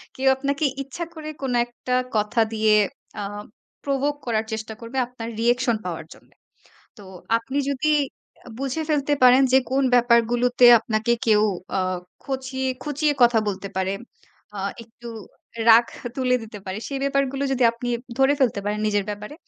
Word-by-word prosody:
কেউ 265 +1 -1
আপনাকে 280 +3 -1 0.2
ইচ্ছা 275 +6 -6
করে 310 -2 -7
কোন 265 -2 -2
একটা 240 +1 -6 0.2
কথা 210 +2 +1
দিয়ে 215 -1 +3 0.5
আ - - -3 0.6
প্রভোক 280 +1 0
করার 225 -2 0
চেষ্টা 220 0 -5
করবে। 230 +3 -7
আপনার 235 -2 -7
রিঅ্যাকশন 240 0 +2
পাওয়ার 165 -3 -5
জন্যে। - - -23 0.6
তো - - -12 0.4
আপনি 260 +5 -4
যদি 280 +3 0 0.6
আ - - -10
বুঝে 275 +3 -2
ফেলতে 295 -1 +1
পারেন। 255 +1 +7
যে 265 - +7
কোন 270 +1 +2
ব্যাপারগুলোতে 245 +1 +4
আপনাকে 220 +1 0
কেউ 210 -1 +5 0.4
আ - - +2 0.4
খচিয়ে 265 -1 -3
খুঁচিয়ে 295 0 0
কথা 240 -1 +5
বলতে 195 0 -4
পারে, 190 0 0 0.6
আ - - -5 0.3
একটু 235 +1 -13 0.6
রাগ 230 +1 +8 0.3
তুলে 255 -1 +2
দিতে 220 -1 -9
পারে। 190 +2 -4
সেই 275 - -3
ব্যাপারগুলো 275 0 0
যদি 260 -1 0
আপনি 240 +1 -6 0.3
ধরে 270 +1 +5
ফেলতে 240 -6 +2
পারেন 210 +1 -2
নিজের 205 -1 +1
ব্যাপারে। 210 +6 -7
245 Hz, 155 wpm, -23 LUFS, 220-270 Hz, 0.6 s, রাগ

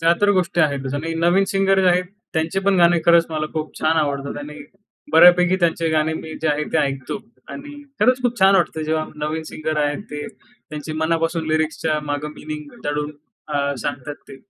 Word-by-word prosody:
त्या 165 +1 +4
तर 205 0 +4
गोष्टी 180 -2 +1
आहेतच 140 -3 0
आणि 165 +3 -3
नवीन 175 +4 +3
सिंगर 195 0 +2
जे 185 - +2
आहेत, 180 +1 +3 0.3
त्यांचे 165 +4 -1
पण 195 0 +2
गाणे 170 0 +5
खरंच 170 0 +6
मला 155 -1 -2
खूप 155 -1 -5
छान 160 +1 +2
आवडतात 140 -2 -1
आणि 150 +1 -8 0.5
बऱ्यापैकी 180 +1 +7
त्यांचे 170 -2 +1
गाणे 155 0 +1
मी 160 0 -7
जे 155 - +2
आहेत 150 0 -1
ते 160 - +3
ऐकतो 135 +4 -2 0.3
आणि 290 0 -9 0.2
खरंच 255 0 +3
खूप 245 -1 0
छान 195 +1 +6
वाटतं 160 -3 0
जेव्हा 155 0 -1
नवीन 155 +2 -3
सिंगर 155 0 -3
आहेत 145 +6 -1
ते 150 0 -5
त्यांचे 155 -11 -10
मनापासून 165 0 0
लिरिक्सच्या 155 0 0
मागं 145 +1 -3
मीनिंग 150 -1 -8
दडून 150 0 -2 0.4
अ, 140 -1 0
सांगतात 145 0 -4
ते. 135 - -10
160 Hz, 185 wpm, -21 LUFS, 150-175 Hz, 0.5 s, बऱ्यापैकी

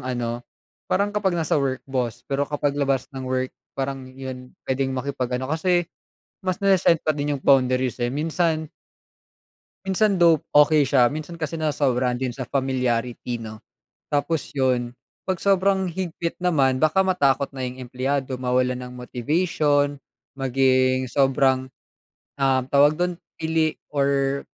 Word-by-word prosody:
ano, 120 -2 -3 0.5
parang 200 +2 +1
kapag 195 -4 0
nasa 155 -3 +1
work, 130 -1 -2
boss, 120 -3 -3
pero 140 +1 -1
kapag 145 -1 0
labas 135 0 0
ng 130 -1 -6
work, 130 0 -1 0.2
parang 135 -1 -3
iyon 130 -1 -9
puwedeng 130 0 -1
makipag-ano 130 -1 -2
kasi 175 +5 +1 0.6
mas 185 -2 -1
nase-set 190 -4 +5
pa 155 - +3
din 145 0 -2
'yung 135 - -14
boundaries 130 -2 +3
eh, 120 - +1
minsan 160 +3 -1 1.1
Minsan, 195 +1 +2
though, 170 -3 +5 0.2
okey 150 -1 +6
siya, 125 -3 +4
minsan 155 +2 -6
kasi 165 0 -4
nasobrahan 130 -5 +1
din 130 -1 -2
sa 130 0 -6
familiarity, 125 -3 -1
'no. 110 -1 -8 0.5
Tapos 145 +2 0
’yon, 125 -3 0 0.3
'pag 185 -1 -1
sobrang 195 -1 +2
higpit 170 -1 -4
naman, 140 -7 +3
baka 155 +4 +4
matakot 140 -6 +2
na 130 - -3
’yung 125 +1 -6
empleyado 130 +1 -2
mawalan 125 0 0
ng 125 - -11
motivation, 145 +3 0 0.4
maging 130 -1 +2
sobrang, 130 0 +2 0.7
um, 135 -1 +3
tawag 145 +2 +5
don, 180 -1 -1 0.2
pili 160 -1 0 0.2
or 140 -1 +1
135 Hz, 135 wpm, -23 LUFS, 130-155 Hz, 1.1 s, okey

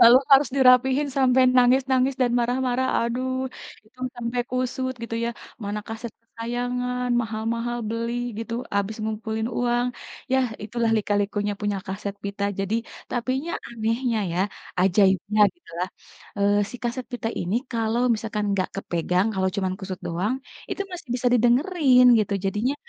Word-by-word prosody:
lalu, 235 +2 +9 0.2
harus 275 +1 +7
dirapihin, 265 +2 +5
sampai 260 -1 +4
nangis-nangis 260 +1 +4
dan 245 - +2
marah-marah, 250 +1 +1 0.2
aduh, 250 +3 -1 0.6
itu 255 +4 -28 0.2
sampai 240 +1 -2
kusut, 255 +1 -1
gitu 230 0 -4
ya, 235 - 0 0.3
mana 205 +1 -2
kaset 225 +1 -6
kesayangan, 245 +2 -3
maha-mahal 230 +2 -2
beli, 230 +1 -2 0.3
gitu, 230 0 -4 0.2
habis 200 +2 -1
ngumpulin 220 +1 -2
uang, 240 0 +1 0.5
yah, 265 -1 +3 0.2
itulah 230 +1 0
lika-likunya 205 0 0
punya 205 -1 0
kaset 195 +1 -4
pita. 200 0 -3 0.2
Jadi 195 +3 -1 0.4
tapinya 260 +6 -1 0.2
anehnya, 230 +1 -1
ya, 175 - 0 0.4
ajaibnya, 195 +2 +3
gitulah, 180 - -5 0.5
eee, 200 0 +3
si - - -7
kaset 240 +1 -3
pita 230 -2 -2
ini, 180 +4 -2 0.2
kalau 225 0 0
misalkan 215 -1 -3
enggak 190 -2 0
kepegang, 180 0 0
kalau 190 0 +1
cuman 190 -2 0
kusut 185 -1 -5
doang, 180 +8 -1 0.4
itu 400 - -2
masih 340 -5 -8
bisa 250 0 -1
didengerin, 250 - +4 0.2
gitu. 205 -1 -1
Jadinya 210 +8 0
235 Hz, 140 wpm, -24 LUFS, 205-250 Hz, 0.6 s, lalu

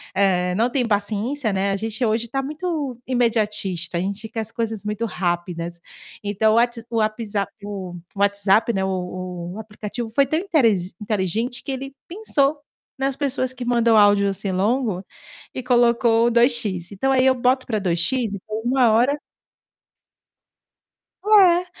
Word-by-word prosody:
eh, 180 -2 +2
não 230 +4 +2
têm 250 -3 +1
paciência, 215 +4 -1
né, 195 +1 0
a - - 0
gente 220 +3 -3
hoje 225 +2 0
tá 270 +4 -2
muito 300 -3 -3
imediatista, 210 -8 0
a - - 0
gente 200 +4 -4
quer 225 - -6
as 220 0 -6
coisas 225 -3 -3
muito 210 +2 -2
rápidas. 175 -3 -3 0.4
Então, 210 +2 +2
o - - +3
What 240 -1 +1
o 230 - -2
Whapsap 215 -2 -1
o 195 -3 -6 0.2
o 200 - -9
WhatsApp, 200 +3 +3
né, 190 -2 0
o - - 0
o 180 -1 -5
o 215 - -7
aplicativo 220 +2 -6
foi 275 +5 +3
tão 310 +4 0
interi 305 - +3 0.2
inteligente 215 +3 -2
que - - -4
ele 270 +1 -6
pensou, 310 -7 0 0.4
nas 270 0 -1
pessoas 260 -2 -1
que 250 -1 -7
mandam 235 -2 +3
áudio 205 -1 +5
assim, 195 0 -3
longo, 200 0 0 0.5
e - - -4
colocou 235 -1 +3
2X, 230 -8 +1
então, 235 +7 0
aí 260 0 +3
eu 260 - +5
boto 255 +1 +1
pra 220 -3 -1
2X 200 +6 0
e - - -7
ponho 215 0 -4
uma 250 -2 +4
hora 245 +6 +3 2.1
É. 375 -4 +5
225 Hz, 160 wpm, -22 LUFS, 200-250 Hz, 2.1 s, áudio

